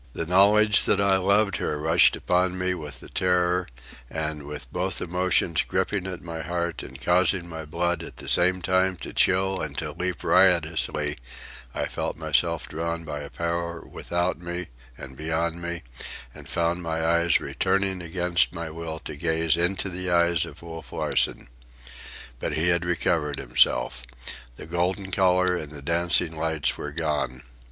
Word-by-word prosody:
The 85 - -2
knowledge 100 +4 +5
that 100 - +2
I 100 -1 +4
loved 100 +1 +2
her 75 - -2
rushed 80 +2 +4
upon 90 0 +1
me 90 0 0
with 75 -6 -7
the - - -11
terror, 90 -1 +1 0.4
and 75 -2 -3
with 70 -5 -8
both 90 +2 -1
emotions 90 -2 +1
gripping 95 -2 -1
at 90 -2 -6
my 85 -1 -5
heart 85 -1 -3
and 65 +1 -10
causing 90 0 +2
my 80 -2 -7
blood 85 +2 -1
at 85 - -9
the - - -7
same 90 +1 +4
time 95 0 +2
to - - -8
chill 95 +1 +3
and - - -4
to - - -2
leap 90 -2 -3
riotously, 80 -5 +3 0.6
I - - 0
felt - - -4
myself 80 +1 +1
drawn 85 +1 -3
by 75 -2 -4
a 70 -1 -6
power 85 0 -3
without 85 +1 -2
me 85 -1 -5 0.3
and 65 - -9
beyond 80 +3 -2
me, 85 -1 -4 0.5
and 70 -2 -11
found 85 +1 0
my 80 -1 -2
eyes 85 0 +3
returning 95 -2 0
against 85 +1 +1
my 85 -1 -5
will 80 0 -5
to - - -6
gaze 80 +1 +1
into 90 +3 +1
the 90 0 -3
eyes 85 -2 +3
of 80 0 -12
Wolf 80 -1 -9
Larsen. - - 0 0.9
But - - -2
he 85 +3 +1
had 85 0 +2
recovered 80 -4 0
himself. - - +2 0.5
The - - -9
golden 90 +3 -1
colour 90 -1 +3
and 75 -4 -5
the 75 -2 -9
dancing 85 +1 +1
lights 80 -1 0
were 75 - -5
gone. 75 -5 -2
85 Hz, 165 wpm, -25 LUFS, 80-90 Hz, 0.9 s, knowledge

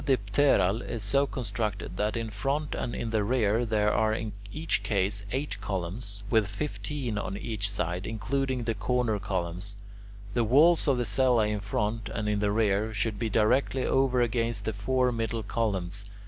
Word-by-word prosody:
The 135 -2 +3
pseudodipteral 100 -1 +2
is 115 -3 -3
so 140 +8 +2
constructed 110 -8 -3
that 105 +2 0
in 115 -1 -3
front 140 +8 -1
and 120 - -3
in 115 -1 -3
the 110 -2 +2
rear 115 0 +2
there 105 -1 +2
are 110 0 +2
in 110 -1 -3 0.2
each 160 +1 0
case 100 0 0
eight 130 -8 -3
columns, 100 +2 -4
with 110 -4 +4
fifteen 130 0 -3
on 100 -1 -4
each 105 -2 -1
side, 90 -2 -2
including 125 +3 -1
the 115 0 0
corner 110 0 0
columns. 95 0 -3 0.6
The 120 - +2
walls 155 +9 +5
of 135 -3 +3
the 120 - 0
cella 120 +1 +3
in 105 0 -1
front 105 +2 -2
and 105 -1 -3
in 105 -1 +1
the 105 0 +1
rear 110 0 +1
should 105 -1 -1
be 115 -1 -1
directly 125 +4 +2
over 130 -2 +3
against 115 -2 -1
the 110 - -1
four 125 +5 +1
middle 115 -1 -2
columns. 100 -3 -2
110 Hz, 175 wpm, -28 LUFS, 100-125 Hz, 0.6 s, walls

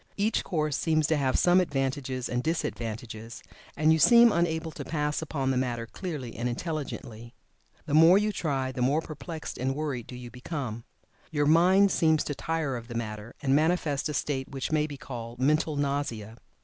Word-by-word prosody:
Each 210 +2 +1
course 155 -5 -1
seems 155 -1 +1
to 155 - +2
have 135 -2 +1
advantages 135 -7 +1
and 125 0 -1
disadvantages, 115 -7 -4 0.3
and 155 +2 +4
you 160 - +2
seem 235 +9 +7
unable 160 -2 0
to - - -7
pass 150 -1 -1
upon 140 -4 -1
the 130 - 0
matter 120 -2 -1
clearly 145 -4 -6
and 120 +1 -2
intelligently. 120 -5 -5 0.5
The - - -4
more 165 +4 +7
you 210 +1 +1
try 135 -8 -1
the 130 - -5
more 140 +5 +2
perplexed 155 +1 -7
and 135 +2 -1
worried 140 -6 -3
do 125 - -8
you 125 -1 -9
become. 125 -3 -5 0.4
Your 145 -2 0
mind 185 +6 +5
seems 160 -2 +3
to 145 - -3
tire 160 -2 -2
of 115 -1 -9
the 120 - -7
matter, 110 0 -5
and 135 -1 +3
manifests 155 -2 +1
a 150 - -3
state 130 -3 -2
which 135 +1 -4
may 155 -1 +2
be 145 -2 -8
called 120 -3 -7
"mental 155 +3 +2
nausea." 140 -6 -2
145 Hz, 180 wpm, -28 LUFS, 125-160 Hz, 0.5 s, seem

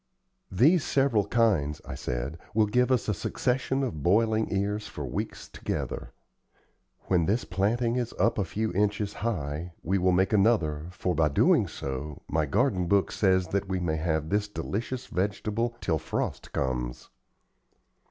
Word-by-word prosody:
"These 145 - +4
several 125 -7 +2
kinds," 95 -12 +2
I - - -6
said, 65 +6 -4 0.2
"will 110 -1 +5
give 125 +4 +2
us 125 - +2
a 105 - +2
succession 130 +6 -1
of 80 - -3
boiling 110 +5 +2
ears 100 +1 -1
for 75 -8 -6
weeks - - -4
together. - - -4 0.9
When 90 -4 +1
this 110 +5 +1
planting 115 +7 0
is 120 -2 -1
up 115 - +2
a - - +2
few 110 +3 -2
inches 105 +1 0
high, 85 -6 -2
we 95 +4 +1
will 90 +1 +3
make 95 +3 +2
another, 85 -8 +2
for, 90 0 -2
by 80 -1 +3
so 75 - -4
doing, - - +4 0.6
my 80 0 0
garden 90 +6 +1
book 100 +1 +2
says 95 -3 +2 0.2
we 95 -1 -1
may 80 -3 -1
have 80 -1 -1
this 105 +2 +1
delicious 120 +5 -4
vegetable 105 +5 -1
till 80 -4 0
frost - - -3
comes." 60 -2 -3
100 Hz, 150 wpm, -28 LUFS, 80-110 Hz, 0.9 s, will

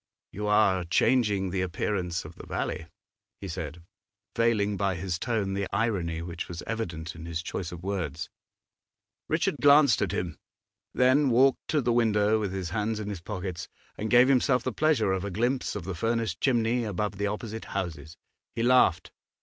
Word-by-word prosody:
'You 105 +1 -4
are 105 -3 +3
changing 100 0 +2
the 95 0 -1
appearance 90 -1 -2
of - - -9
the - - -12
valley,' - - -3 0.5
he 100 - -6
said, 80 -1 -6 0.5
veiling 110 -3 +2
by 100 -1 0
his 85 0 -3
tone 110 -5 -1
the 100 0 -1
irony 95 -7 -1
which 85 -1 -5
was 85 0 -7
evident 85 -8 -4
in 80 0 -9
his 85 0 -3
choice 90 -2 -4
of 90 -1 -9
words. 90 -4 -3 1.0
Richard 160 -2 +1
glanced 145 -3 +6
at 100 -4 0
him, 85 -4 -3 0.5
then 130 +3 +4
walked 130 +3 +3
to 150 - +1
the 120 -1 +1
window, 110 -2 +3
with 100 -3 -2
his 95 -3 -4
hands 105 +2 -1
in 105 -1 -4
his 100 -5 -5
pockets, 90 -2 -5 0.3
and 110 - -4
gave 120 +3 +6
himself 130 -1 +3
the 130 - -2
pleasure 145 -10 +2
of 95 -1 -1
a 100 - -3
glimpse 120 +7 -1
of 105 - -4
the 95 +3 -4
furnace 115 +1 0
chimney 120 +3 +1
above 105 -1 -3
the 105 - +1
opposite 110 +1 -5
houses. 80 -3 -5 0.4
He 115 - -1
laughed. 125 -8 +4
105 Hz, 175 wpm, -28 LUFS, 90-115 Hz, 1.0 s, glanced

